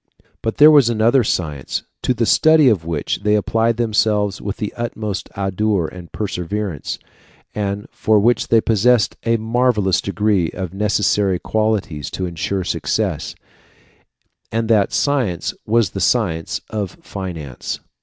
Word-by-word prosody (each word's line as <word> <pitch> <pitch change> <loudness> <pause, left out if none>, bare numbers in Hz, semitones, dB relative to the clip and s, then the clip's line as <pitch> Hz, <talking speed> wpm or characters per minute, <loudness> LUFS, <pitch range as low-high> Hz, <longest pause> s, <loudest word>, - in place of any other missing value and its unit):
But 110 - -2
there 150 +2 +8
was 140 -6 +6
another 120 +3 +3
science, 75 -10 -2 0.2
to 125 - 0
the 115 - +1
study 155 +2 +5
of 95 -8 0
which 80 -3 -2
they 105 0 +2
applied 115 +2 +1
themselves 105 -3 +1
with 100 0 -4
the 105 - -4
utmost 110 -4 -4
ardour 100 -1 0
and 90 0 -11
perseverance, 95 -4 -3 0.6
and 100 -1 -3
for 110 -1 +2
which 115 +2 +2
they 115 -1 +4
possessed 115 +1 +2
in 115 - +1
a - - +1
marvellous 110 -4 +1
degree 100 -4 0
the 90 -2 -5
necessary 100 -1 +1
qualities 105 -7 -1
to 95 - -4
insure 95 +2 -2
success, - - -2 1.2
and 115 0 -1
that 105 -3 +3
science 125 - 0
was 110 -4 +2
the 95 - -4
science 85 -8 0
of 100 -3 -4
finance. 85 -10 -6
105 Hz, 140 wpm, -19 LUFS, 95-115 Hz, 1.2 s, there